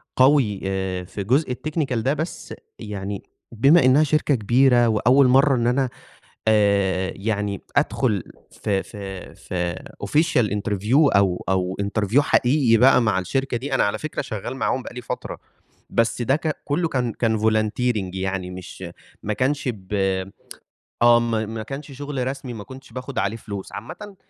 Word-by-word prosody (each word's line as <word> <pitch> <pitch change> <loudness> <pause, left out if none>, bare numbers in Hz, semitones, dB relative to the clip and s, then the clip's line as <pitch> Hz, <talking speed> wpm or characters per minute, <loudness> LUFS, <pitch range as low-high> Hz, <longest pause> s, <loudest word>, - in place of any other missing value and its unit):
قوي 130 -7 +4
آآ 95 -1 -2
في 100 +2 -6
جزء 130 +4 +1
الtechnical 150 -3 -2
ده، 130 +5 +1
بس 155 +3 -5 0.3
يعني 100 -2 -5 0.3
بما 135 +6 +5
إنّها 135 +4 +5
شركة 150 -1 +2
كبيرة 120 +2 +4
وأول 125 +5 +4
مرّة 135 +2 +5
إن 120 -1 +1
أنا 130 +1 +1 0.6
آآ 100 -3 +2
يعني 100 -1 -2 0.2
أدخُل 120 - +1 0.3
في 100 -2 -2
في 95 -2 -9
في 90 -2 -3 0.3
official 150 - +2
interview 105 +2 -2 0.2
أو 95 -3 +1
أو 95 0 0
interview 105 +5 +1
حقيقي 130 -4 +3
بقى 125 +1 +6
مع 110 -5 +1
الشركة 125 +7 -1
دي، 135 +3 -5
أنا - - +3
على 100 +1 0
فكرة 155 +4 -4
شغّال 120 0 -5
معاهم 130 -1 -1
بقى - - -9
لي 125 - -6
فترة، - - -5 0.5
بس 115 +1 +1
ده 130 +4 +2
ك 155 -1 -2
كُلّه 165 +4 0
كان 125 -7 -1
كان 110 -2 0
volunteering 110 -1 +1
يعني 95 -1 -3
مش 90 -1 -9 0.4
ما 105 - -1
كانش 135 +3 0
ب 95 0 -11 1.1
آه، 120 0 +7
ما 115 -2 -1
ما 110 0 -5
كانش 140 +3 -7
شُغل 140 -2 -4
رسمي، 135 -2 -5
ما 105 -2 -7
كنتش 130 -1 -13
باخُد 130 +1 -7
عليه 105 +4 -1
فلوس. 100 -3 -7
عامةً 205 -2 -8
115 Hz, 160 wpm, -23 LUFS, 100-135 Hz, 1.1 s, آه